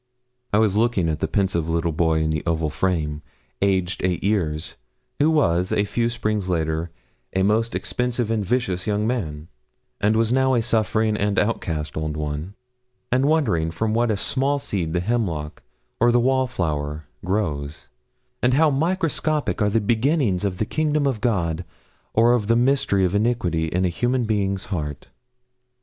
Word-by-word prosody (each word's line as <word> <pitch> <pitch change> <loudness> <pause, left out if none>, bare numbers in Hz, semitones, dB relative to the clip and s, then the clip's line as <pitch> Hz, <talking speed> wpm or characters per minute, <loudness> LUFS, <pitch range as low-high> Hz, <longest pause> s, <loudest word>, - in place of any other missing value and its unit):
I 105 - +3
was 105 -2 +3
looking 110 -6 +2
at 80 - -2
the - - 0
pensive 85 -1 0
little 85 0 0
boy 80 0 +1
in 80 0 0
the 75 -1 -1
oval 80 -2 0
frame 80 -5 -1 0.4
aged 95 -2 +1
eight 90 -2 0
years 85 -6 0 0.5
who 150 +2 +4
was, 90 - +2
a 105 - +2
few 115 +3 0
springs 105 -5 -2
later, 80 -1 -1 0.4
'a 95 - +1
most 110 +3 +1
expensive 125 -2 -1
and 110 -2 0
vicious 95 -4 -1
young 105 0 0
man,' 80 -11 -3 0.5
and 105 +2 +2
was 115 +1 +2
now 130 0 +3
a 120 - +2
suffering 110 -1 +1
and 105 -1 0
outcast 80 -8 -1
old 80 -1 -3
one, 75 +5 -4 0.6
and 130 +2 +3
wondering 115 - +2
from 110 +7 -1
what 120 +1 +2
a 105 - +1
small 135 +7 0
seed 90 - -3
the 90 - +1
hemlock 90 -9 -2 0.4
or 120 +1 +5
the 120 - +4
wallflower 85 - 0 0.2
grows, 80 -7 -2 0.5
and 125 +1 +3
how 155 +1 +4
microscopic 155 - 0
are 105 - +3
the 115 +2 +2
beginnings 115 - +1
of 95 -3 -1
the 110 - 0
kingdom 150 +3 0
of 130 -6 -1
God 90 -8 0 0.5
or 115 +2 +5
of 110 -4 0
the 115 - +4
mystery 120 -6 +2
of 90 - -1
iniquity 100 -7 +1
in 90 +3 0
a - - +2
human 120 +8 0
being's 100 -3 -1
heart. 75 -5 -4
100 Hz, 165 wpm, -23 LUFS, 85-120 Hz, 0.6 s, or